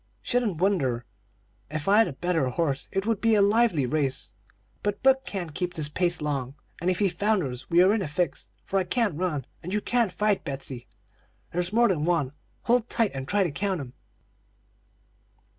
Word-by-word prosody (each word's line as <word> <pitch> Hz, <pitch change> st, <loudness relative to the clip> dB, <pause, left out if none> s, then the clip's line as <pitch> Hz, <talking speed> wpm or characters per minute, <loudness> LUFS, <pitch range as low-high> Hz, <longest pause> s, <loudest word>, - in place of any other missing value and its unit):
"'Shouldn't 240 Hz, -8 st, 0 dB
wonder. 135 Hz, -11 st, +1 dB, 0.6 s
If 155 Hz, +2 st, -4 dB
I 205 Hz, +2 st, +6 dB
had 225 Hz, -, +5 dB
a -, -, -5 dB
better 165 Hz, -1 st, 0 dB
horse 140 Hz, +1 st, -1 dB
it 195 Hz, +1 st, -1 dB
would 225 Hz, -2 st, 0 dB
be 225 Hz, -1 st, +4 dB
a 205 Hz, -, +4 dB
lively 205 Hz, -, +3 dB
race; 135 Hz, 0 st, -2 dB, 0.5 s
but 205 Hz, 0 st, -2 dB
Buck 265 Hz, 0 st, +4 dB
can't 175 Hz, -6 st, -4 dB
keep 180 Hz, +2 st, -3 dB
this 150 Hz, -2 st, 0 dB
pace 175 Hz, 0 st, +1 dB
long, 140 Hz, -3 st, -2 dB, 0.3 s
and 175 Hz, -, +1 dB
if 180 Hz, -, +1 dB
he 205 Hz, -, +3 dB
founders 170 Hz, -, -1 dB
we 175 Hz, +1 st, +6 dB
are 190 Hz, +3 st, +5 dB
in 220 Hz, -, 0 dB
a 185 Hz, -, -2 dB
fix, 150 Hz, -1 st, -2 dB, 0.2 s
for 195 Hz, -, 0 dB
I -, -, +1 dB
can't 220 Hz, +1 st, 0 dB
run, 155 Hz, -8 st, -1 dB, 0.2 s
and 180 Hz, -, -6 dB
you 210 Hz, -, +1 dB
can't 235 Hz, -2 st, +1 dB
fight. 210 Hz, 0 st, +1 dB
Betsey, 135 Hz, -3 st, -5 dB, 0.6 s
there's 175 Hz, +1 st, -1 dB
more 235 Hz, +2 st, +4 dB
than 170 Hz, -8 st, 0 dB
one; 165 Hz, -7 st, +1 dB, 0.3 s
hold 240 Hz, 0 st, +2 dB
tight 225 Hz, -3 st, +1 dB
and 135 Hz, 0 st, -5 dB
try 200 Hz, +3 st, +3 dB
to 175 Hz, -, -1 dB
count 190 Hz, +5 st, -1 dB
'em.' 130 Hz, -3 st, -8 dB
180 Hz, 195 wpm, -26 LUFS, 145-205 Hz, 0.6 s, I